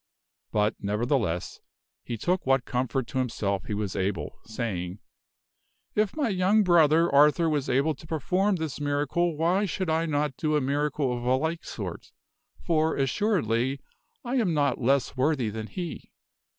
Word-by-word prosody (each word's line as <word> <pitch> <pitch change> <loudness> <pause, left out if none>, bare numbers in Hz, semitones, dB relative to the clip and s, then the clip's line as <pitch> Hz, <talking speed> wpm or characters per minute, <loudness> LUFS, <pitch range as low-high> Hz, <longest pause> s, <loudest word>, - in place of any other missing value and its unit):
But, 105 0 +2
nevertheless, 105 - -1 0.4
he 120 - -4
took 180 - 0
what 135 -1 +3
comfort 130 +1 -1
to 130 - -2
himself 100 -6 -1
he 105 - -3
was 100 -2 -3
able, 95 -6 -2
saying, 100 -6 -4 1.0
"If 210 -1 +1
my 285 -6 +1
young 195 +2 +3
brother 165 -2 +5
Arthur 150 +4 +5
was 150 -4 0
able 140 +5 +2
to 150 +3 -14
perform 185 +6 +1
this 160 -4 -4
miracle 145 +3 0
why 175 +6 +2
should 185 -2 -2
I 165 +1 +1
not 145 -2 0
do 155 -1 0
a - - +4
miracle 140 -1 0
of 120 - -5
a 125 +1 +3
like 160 +5 -2
sort, - - -7 0.5
for, 160 -1 +2
assuredly, 135 - +1 0.5
I 250 +2 -1
am 190 -10 +1
not 140 -4 +1
less 135 +3 +2
worthy 130 -4 +1
than 110 0 -5
he. 175 +2 -6
145 Hz, 155 wpm, -27 LUFS, 120-165 Hz, 1.0 s, brother